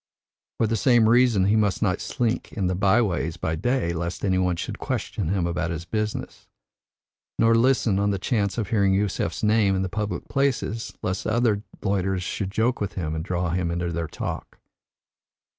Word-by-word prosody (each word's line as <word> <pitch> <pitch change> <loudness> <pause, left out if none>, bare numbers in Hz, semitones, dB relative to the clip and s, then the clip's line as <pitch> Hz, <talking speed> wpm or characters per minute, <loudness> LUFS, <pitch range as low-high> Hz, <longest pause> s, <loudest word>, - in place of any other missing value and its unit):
For - - +2
the 110 +1 0
same 115 0 +4
reason 115 -4 +4
he 100 +2 +3
must 105 -1 +1
not 95 -2 0
slink 120 -3 -2
in 100 -4 -1
the 90 - +1
by 100 +5 +3
ways 85 -5 -2
by 80 -1 -2
day 95 +1 0
lest 85 +3 -3
any 95 -2 +2
should - - -5
question 100 - -3
him 95 -2 0
about 85 -1 -1
his 85 0 -4
business; 105 +1 -4 0.9
nor 115 0 +4
listen 115 -4 +3
on 100 0 +2
the 100 - 0
chance 100 +1 -1
of 110 -4 -2
hearing 100 -3 +3
Yusef's 100 -3 -1
name 105 -2 +3
in 95 - 0
the 95 - -2
public 105 -2 -3
places 130 -5 -1
lest 90 +1 -2
other 110 -2 +2 0.2
loiterers 95 -2 0
should 95 +2 -3
joke 115 +4 0
with 100 -1 -2
him 80 -4 -3
and 80 0 -3
draw 90 -1 -1
him 90 0 0
into 85 0 -2
their 85 0 -2
talk. - - -6
100 Hz, 185 wpm, -24 LUFS, 90-110 Hz, 0.9 s, same